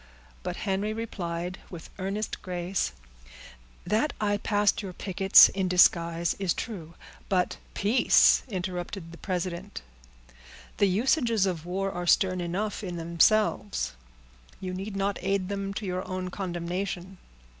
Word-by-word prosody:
But 180 Hz, -1 st, -4 dB
Henry 200 Hz, +2 st, -1 dB
replied, 180 Hz, -5 st, -4 dB
with 170 Hz, -3 st, -10 dB
earnest 195 Hz, +3 st, -3 dB
grace,— 180 Hz, 0 st, -2 dB, 0.9 s
"That 225 Hz, +8 st, +1 dB
I 205 Hz, -1 st, +1 dB
passed 205 Hz, 0 st, +1 dB
your 190 Hz, -3 st, -6 dB
pickets 190 Hz, +1 st, +6 dB
in 190 Hz, -1 st, -1 dB
disguise, 170 Hz, -2 st, +3 dB
is 190 Hz, -4 st, 0 dB
true; 170 Hz, -8 st, -6 dB, 0.3 s
but—" 180 Hz, -2 st, +1 dB, 0.2 s
"Peace!" 210 Hz, +6 st, +5 dB
interrupted 180 Hz, -3 st, -5 dB
the 170 Hz, -, -12 dB
president. 185 Hz, +1 st, -4 dB, 0.9 s
"The 200 Hz, -, +4 dB
usages 230 Hz, -, +2 dB
of 175 Hz, -3 st, -3 dB
war 195 Hz, +2 st, -1 dB
are 175 Hz, -1 st, -4 dB
stern 185 Hz, 0 st, +3 dB
enough 200 Hz, +5 st, -3 dB
in 180 Hz, -3 st, -4 dB
themselves; 185 Hz, -, +2 dB, 0.7 s
you 185 Hz, -1 st, -5 dB
need 195 Hz, +2 st, -5 dB
not 200 Hz, 0 st, -1 dB
aid 195 Hz, 0 st, 0 dB
them 200 Hz, -1 st, -3 dB
to 210 Hz, -, -4 dB
your 185 Hz, -1 st, -2 dB
own 185 Hz, 0 st, -4 dB
condemnation." 180 Hz, 0 st, -4 dB
190 Hz, 130 wpm, -27 LUFS, 175-200 Hz, 0.9 s, pickets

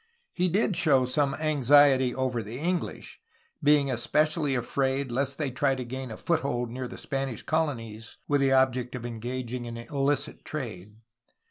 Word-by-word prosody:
He 180 Hz, 0 st, +1 dB
did 200 Hz, +1 st, +1 dB
show 145 Hz, -9 st, +4 dB
some 135 Hz, +2 st, +1 dB
anxiety 145 Hz, -3 st, +4 dB
over 130 Hz, -2 st, -1 dB
the 110 Hz, +3 st, -7 dB
English, 175 Hz, +4 st, -3 dB, 0.4 s
being 145 Hz, -2 st, +4 dB
especially 150 Hz, +4 st, +1 dB
afraid 130 Hz, +2 st, -1 dB
lest 140 Hz, +2 st, 0 dB
they 145 Hz, -4 st, -2 dB
try 135 Hz, +1 st, +1 dB
to 130 Hz, -1 st, -5 dB
gain 130 Hz, +1 st, -5 dB
a 110 Hz, -, -7 dB
foothold 135 Hz, -8 st, -1 dB
near 125 Hz, +1 st, -4 dB
the -, -, -9 dB
Spanish 135 Hz, -4 st, -3 dB
colonies, 115 Hz, -9 st, -2 dB
with 145 Hz, -1 st, +2 dB
the 135 Hz, -1 st, +3 dB
object 130 Hz, -2 st, +2 dB
of 120 Hz, -2 st, -6 dB
engaging 120 Hz, +1 st, -4 dB
in 115 Hz, 0 st, -6 dB
illicit 140 Hz, +3 st, -1 dB
trade. 105 Hz, -9 st, -6 dB
135 Hz, 155 wpm, -27 LUFS, 120-145 Hz, 0.4 s, show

